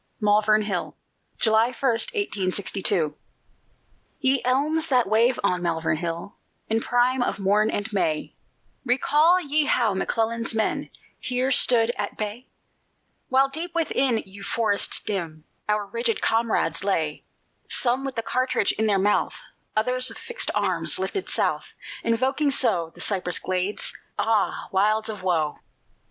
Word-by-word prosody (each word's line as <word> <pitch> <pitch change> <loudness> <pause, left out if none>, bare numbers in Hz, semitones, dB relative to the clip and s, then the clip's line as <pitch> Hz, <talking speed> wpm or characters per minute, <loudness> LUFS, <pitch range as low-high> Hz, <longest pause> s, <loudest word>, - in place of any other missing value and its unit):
MALVERN 215 0 +3
HILL 195 -4 -4 0.4
[July 220 0 +3
1, 250 - -7
1862] 200 - 0 1.1
Ye 265 -1 +2
elms 300 +6 +1
that 250 -4 +3
wave 230 +4 +3
on 180 -3 +1
Malvern 165 -2 -1
Hill 170 +4 -5 0.4
In 225 +1 +1
prime 245 +2 +1
of - - -1
morn 205 +2 +2
and 205 -1 -2
May, 155 -6 -1 0.5
Recall 295 +7 +3
ye 300 -2 0
how 235 -7 +2
McClellan's 230 +4 0
men 220 - -1 0.3
Here 255 +1 0
stood 240 -2 +4
at - - -4
bay? 215 +4 -5 0.8
While 265 +1 +4
deep 330 +5 -2
within 270 -8 +1
yon 195 +1 -10
forest 205 0 +1
dim 165 -6 -3 0.3
Our 210 -1 +1
rigid 230 +2 -2
comrades 225 -7 0
lay 160 -6 -1 0.5
Some 250 +1 +1
with 270 -1 -4
the 230 - -2
cartridge 255 -3 +1
in 220 - -1
their 205 -2 +3
mouth, 205 +2 +1 0.4
Others 250 +4 0
with - - -5
fixed 480 0 -2
arms - - +1
lifted 390 -3 -3
South - - -1 0.3
Invoking 260 +6 +1
so 175 -12 +2
The - - -8
cypress 185 -3 0
glades? 185 +2 -1 0.2
Ah 220 -3 0
wilds 215 +3 +1
of 210 -3 -6
woe! 165 -5 0
220 Hz, 135 wpm, -24 LUFS, 195-255 Hz, 1.1 s, stood